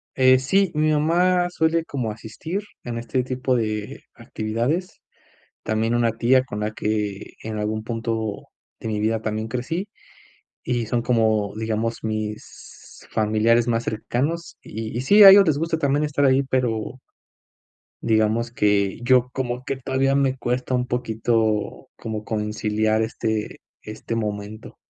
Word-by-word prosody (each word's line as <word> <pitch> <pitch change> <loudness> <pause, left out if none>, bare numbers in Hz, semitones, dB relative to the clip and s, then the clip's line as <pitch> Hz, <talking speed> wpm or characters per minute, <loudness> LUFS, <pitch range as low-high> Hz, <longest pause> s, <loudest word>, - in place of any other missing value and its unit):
Eh, 130 0 +5
sí, 190 +8 +2
mi 155 0 +2
mamá 175 +4 +2
suele 165 -1 +1
como 125 -8 -3
asistir 120 - -5 0.2
en 120 -1 -5
este 120 +2 -1
tipo 130 0 -1
de 110 -3 -3
actividades. 120 +12 -3 0.6
También 110 +2 0
una 120 -1 +2
tía 130 +2 +4
con 105 -5 -6
la 105 0 -1
que, 105 -2 -3
en 110 -1 -5
algún 110 +1 -2
punto 115 -2 -3 0.3
de - - -8
mi 105 -1 -2
vida, 110 +1 0
también 110 0 -3
crecí. 145 - -3 0.7
Y 120 -2 -1
son 120 +2 0
como, 110 -4 +1
digamos, 110 +1 -2
mis 110 -1 -7
familiares 110 +2 +2
más 115 -1 +1
cercanos. 140 +9 -3
Y 110 +1 -6
y - - 0
sí, 205 +11 +7
a 195 - +13
ellos 200 +1 +9
les 150 -3 +2
gusta 165 +1 -1
también 145 0 +1
estar 145 -1 0
ahí, 135 0 +4
pero 125 -2 -1 1.0
digamos 110 +1 +1
que 100 -4 +1
yo 125 0 +4
como 125 -1 -3
que 135 - -3
todavía 135 +1 0
me 135 -2 +2
cuesta 125 0 -2
un 125 0 0
poquito 110 -3 -1
como 110 -1 -5
conciliar 110 0 0
este 110 -1 -3 0.2
este 110 +2 -6
momento. 105 -1 -5
115 Hz, 145 wpm, -23 LUFS, 110-130 Hz, 1.0 s, a